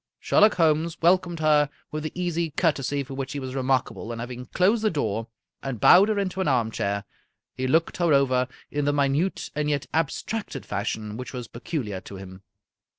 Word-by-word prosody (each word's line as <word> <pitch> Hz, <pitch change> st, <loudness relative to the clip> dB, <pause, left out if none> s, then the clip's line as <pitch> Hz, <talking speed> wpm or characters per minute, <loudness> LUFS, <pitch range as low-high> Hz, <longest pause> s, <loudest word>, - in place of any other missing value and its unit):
Sher -, -, +2 dB
lock 210 Hz, +1 st, +6 dB
Holmes 165 Hz, -1 st, +2 dB
welcomed 175 Hz, -1 st, +2 dB
her 150 Hz, -2 st, +4 dB, 0.2 s
with 155 Hz, -, -3 dB
the 155 Hz, -, -4 dB
easy 170 Hz, -2 st, -1 dB
courtesy 145 Hz, -3 st, 0 dB
for 135 Hz, 0 st, -9 dB
which 135 Hz, -1 st, -4 dB
he 145 Hz, -, -3 dB
was 130 Hz, -1 st, -5 dB
remarkable, 130 Hz, -3 st, -1 dB
and 115 Hz, -, -5 dB
having 125 Hz, +1 st, -6 dB
closed 205 Hz, -, +2 dB
the 215 Hz, -, +4 dB
door, 115 Hz, -, -2 dB, 0.3 s
and 135 Hz, -5 st, -4 dB
bowed 190 Hz, -, +7 dB
her 215 Hz, -, +1 dB
into 190 Hz, -1 st, -1 dB
an 185 Hz, -, 0 dB
armchair, 110 Hz, -6 st, 0 dB, 0.5 s
he 130 Hz, -, -2 dB
looked 160 Hz, +5 st, +2 dB
her 175 Hz, -2 st, +2 dB
over 130 Hz, -3 st, +3 dB, 0.2 s
in 145 Hz, 0 st, -1 dB
the 145 Hz, -, +2 dB
minute 145 Hz, +6 st, 0 dB
and 150 Hz, 0 st, -1 dB
yet 145 Hz, -2 st, 0 dB
abstracted 160 Hz, -, -2 dB
fashion 105 Hz, +1 st, -3 dB
which 125 Hz, +2 st, -7 dB
was 125 Hz, -3 st, -5 dB
peculiar 115 Hz, -, -4 dB
to 100 Hz, -, -10 dB
him. 95 Hz, 0 st, -10 dB
140 Hz, 190 wpm, -25 LUFS, 125-165 Hz, 0.5 s, bowed